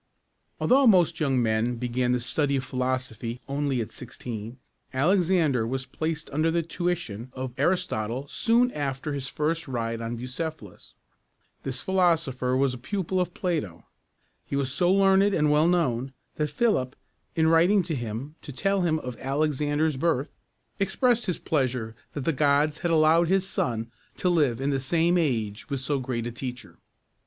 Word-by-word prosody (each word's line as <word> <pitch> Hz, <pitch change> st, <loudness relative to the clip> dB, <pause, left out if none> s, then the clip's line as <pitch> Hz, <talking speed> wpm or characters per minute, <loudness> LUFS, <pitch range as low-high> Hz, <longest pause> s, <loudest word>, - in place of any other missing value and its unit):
Although 265 Hz, +1 st, +4 dB
most 175 Hz, -5 st, +4 dB
young 135 Hz, -5 st, +2 dB
men 110 Hz, +2 st, +1 dB
began 125 Hz, +1 st, -1 dB
the 125 Hz, -, +2 dB
study 140 Hz, +4 st, 0 dB
of 130 Hz, -, -1 dB
philosophy 125 Hz, -2 st, -3 dB
only 140 Hz, -2 st, 0 dB
at 110 Hz, -, -5 dB
sixteen, 115 Hz, -1 st, -7 dB, 0.4 s
Alexander 160 Hz, -, +2 dB
was 130 Hz, +2 st, -2 dB
placed 160 Hz, +1 st, -3 dB
under 155 Hz, +3 st, +1 dB
the 170 Hz, +1 st, +1 dB
tuition 165 Hz, -, -3 dB
of 130 Hz, -1 st, -5 dB
Ar´is 175 Hz, +7 st, +2 dB
totle 115 Hz, +6 st, -3 dB
soon 235 Hz, -, +2 dB
after 145 Hz, -, -3 dB
his 135 Hz, -2 st, -3 dB
first 155 Hz, +3 st, -2 dB
ride 115 Hz, -3 st, -2 dB
on 115 Hz, +1 st, -3 dB
Bucephalus. 125 Hz, -, -6 dB, 0.7 s
This 130 Hz, -1 st, -3 dB
philosopher 165 Hz, -9 st, +1 dB
was 135 Hz, -1 st, +2 dB
a 125 Hz, -, -7 dB
pupil 185 Hz, +5 st, -1 dB
of 180 Hz, -1 st, -3 dB
Plato. 150 Hz, -, -2 dB, 0.6 s
He -, -, -3 dB
was 135 Hz, -2 st, 0 dB
so 175 Hz, +5 st, +2 dB
learned 195 Hz, +1 st, +4 dB
and 150 Hz, -1 st, +3 dB
well 150 Hz, +2 st, +4 dB
known, 135 Hz, -7 st, +1 dB, 0.2 s
that 150 Hz, -1 st, 0 dB
Philip, 145 Hz, -, +1 dB, 0.4 s
in 160 Hz, -1 st, +3 dB
writing 175 Hz, +5 st, +5 dB
to 170 Hz, -1 st, -3 dB
him 120 Hz, +2 st, -4 dB
to 145 Hz, -, -8 dB
tell 195 Hz, +8 st, 0 dB
him 165 Hz, -3 st, +2 dB
of 125 Hz, -5 st, -6 dB
Alexander's 145 Hz, +1 st, 0 dB
birth, 145 Hz, -2 st, 0 dB, 0.5 s
expressed 235 Hz, +4 st, +2 dB
his 180 Hz, -, 0 dB
pleasure 125 Hz, -6 st, -1 dB, 0.2 s
that 145 Hz, -, -4 dB
the 165 Hz, -, +2 dB
gods 145 Hz, +2 st, +2 dB
had 175 Hz, -, -1 dB
allowed 165 Hz, +1 st, +4 dB
his 190 Hz, +1 st, +2 dB
son 115 Hz, -, -2 dB, 0.3 s
to 180 Hz, -, +1 dB
live 145 Hz, -9 st, +2 dB
in 135 Hz, +2 st, 0 dB
the 135 Hz, -, 0 dB
same 165 Hz, +6 st, +2 dB
age 115 Hz, -, -1 dB
with 140 Hz, -2 st, -2 dB
so 140 Hz, +2 st, -1 dB
great 125 Hz, -3 st, -3 dB
a 120 Hz, -, -3 dB
teacher. 125 Hz, +1 st, -7 dB
145 Hz, 165 wpm, -26 LUFS, 125-170 Hz, 0.7 s, writing